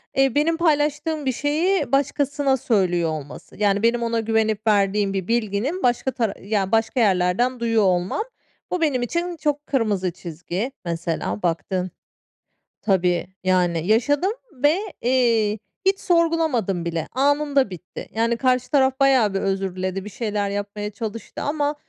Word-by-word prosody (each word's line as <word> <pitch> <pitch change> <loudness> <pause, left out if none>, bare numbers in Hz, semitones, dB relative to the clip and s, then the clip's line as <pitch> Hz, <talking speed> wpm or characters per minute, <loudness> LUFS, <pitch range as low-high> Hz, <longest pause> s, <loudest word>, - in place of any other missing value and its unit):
eee, 270 -2 +3
benim 320 +3 +2
paylaştığım 305 -1 +1
bir 260 - +2
şeyi 300 +3 0
başkasına 280 0 +1
söylüyor 180 -8 +1
olması. 150 -2 -7
Yani, 205 0 +1
benim 235 0 +2
ona 230 0 0
güvenip 220 -1 0
verdiğim 200 -1 +2
bir 190 -2 -3
bilginin 235 - -1
başka 250 +2 +1
tar 225 -6 -1
ya, 195 -2 -2
başka 225 +2 +1
yerlerden 205 +5 +2
duyuyor 225 -2 +2
olmam. 185 - +1 0.5
Bu 360 -2 -1
benim 280 -6 +1
için 340 +7 -2
çok 295 -1 -2
kırmızı 205 -9 0
çizgi. 180 - -5
Mesela 170 +3 -3
baktığın 180 +2 -1 0.9
Tabii, 180 -4 +1 0.2
yani, 175 -2 +1
yaşadım 290 - +2 0.2
ve, 290 +5 +2 0.2
eee, 230 -4 +2 0.3
hiç 390 0 +3
sorgulamadım 320 - +1
bile. 165 -1 -2
Anında 280 -1 +2
bitti. 180 -1 -9
Yani, 230 +1 +1
karşı 255 0 +1
taraf 265 -1 +3
bayağı 260 -7 +4
bir 195 - 0
özür 195 -1 -1
diledi, 185 +1 -3
bir - - -6
şeyler 205 -2 -2
yapmaya 205 +1 -4
çalıştı 220 +1 -6
ama 290 0 -1
225 Hz, 145 wpm, -22 LUFS, 195-280 Hz, 0.9 s, bayağı